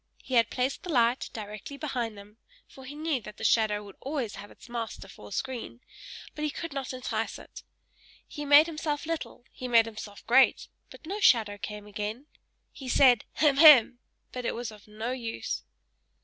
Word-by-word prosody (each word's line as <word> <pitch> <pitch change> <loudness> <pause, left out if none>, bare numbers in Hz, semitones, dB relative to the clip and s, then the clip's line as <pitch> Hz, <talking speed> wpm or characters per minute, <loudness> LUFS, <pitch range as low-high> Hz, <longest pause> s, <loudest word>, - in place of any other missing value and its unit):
He 260 - -7
had 230 -2 +4
placed 255 +2 -2
the 360 - -6
light 240 -2 +2
directly 215 +5 -8
behind 245 -7 -3
him, 205 +2 -14 0.3
for 265 - -14
he 280 +3 -8
knew 305 -4 -1
that 210 - -11
the - - -9
shadow 210 -2 +2
would 200 -1 -13
always 265 -6 -3
have 205 - -9
its - - -16
master 230 -4 -5
for 105 - -13
a - - -14
screen, 250 -2 -5 0.5
but 300 - -6
he 305 - +1
could 330 +1 -6
not 275 -2 -4
entice 230 -3 -3
it. - - -12 0.7
He 295 - -7
made 290 +2 +7
himself 305 -2 -3
little; 320 -6 -5
he 255 - -7
made 230 -2 +5
himself 215 -2 -9
great: 245 +4 +4 0.2
but - - -14
no 395 +6 -4
shadow 220 - +4
came 210 0 -7
again. 210 +5 -5 0.5
He 265 -3 -9
said, 250 -2 +5
"Hem! 290 -3 +3
hem!" 275 -6 +8 0.3
but 250 - -5
it - - -2
was 235 -1 -5
of 210 -1 -15
no 220 +3 -5
use. 235 -3 -4
245 Hz, 190 wpm, -28 LUFS, 215-280 Hz, 0.7 s, hem